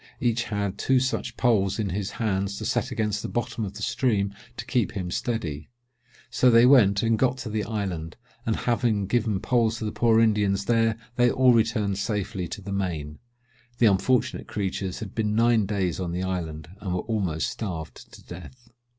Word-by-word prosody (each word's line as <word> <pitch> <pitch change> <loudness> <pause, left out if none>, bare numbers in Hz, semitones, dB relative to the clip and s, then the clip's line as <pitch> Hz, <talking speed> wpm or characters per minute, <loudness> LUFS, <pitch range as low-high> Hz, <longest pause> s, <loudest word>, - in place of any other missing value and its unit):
Each 120 -1 +1
had 100 -2 -3
two 130 -1 +3
such 125 -2 -2
poles 105 -6 +2
in 105 -3 -1
his 100 +2 -3
hands 100 -3 -1
to - - -5
set - - 0
against 105 -1 -1
the - - -4
bottom 120 -1 -2
of 100 -2 -5
the - - -6
stream 110 -5 0 0.2
to - - -5
keep 120 -7 0
them 90 -3 -3
steady: 85 - -3 0.6
so 125 +1 +4
they 115 0 +7
went 110 -7 +5
and 115 -1 +2
got 130 0 +2
to 125 - -6
the 105 0 -1
island, 95 -7 -4 0.3
and 110 -2 0
having 115 -4 0
given 110 -2 0
poles 115 -2 +1
to 110 - -4
the 105 - -2
poor 115 -1 +3
Indians 105 -3 +2
there, 115 -1 +2 0.2
they 120 0 +5
all 130 0 +4
returned 110 -4 +1
safely 100 -3 -2
to 100 - -7
the 100 +1 -5
main. 80 -6 -3 0.6
The 120 - +4
unfortunate 120 +5 +2
creatures 95 -2 -3
had 105 -3 -6
been 105 -2 -1
nine 115 -2 +3
days 95 -4 -1
on 90 -2 -3
the 90 +1 -2
island, 80 -5 -4
and 95 -3 -3
were 90 - -1
almost 95 -8 -1
starved 85 -8 -6
to - - -14
death." 120 +8 -12
105 Hz, 190 wpm, -25 LUFS, 95-115 Hz, 0.6 s, they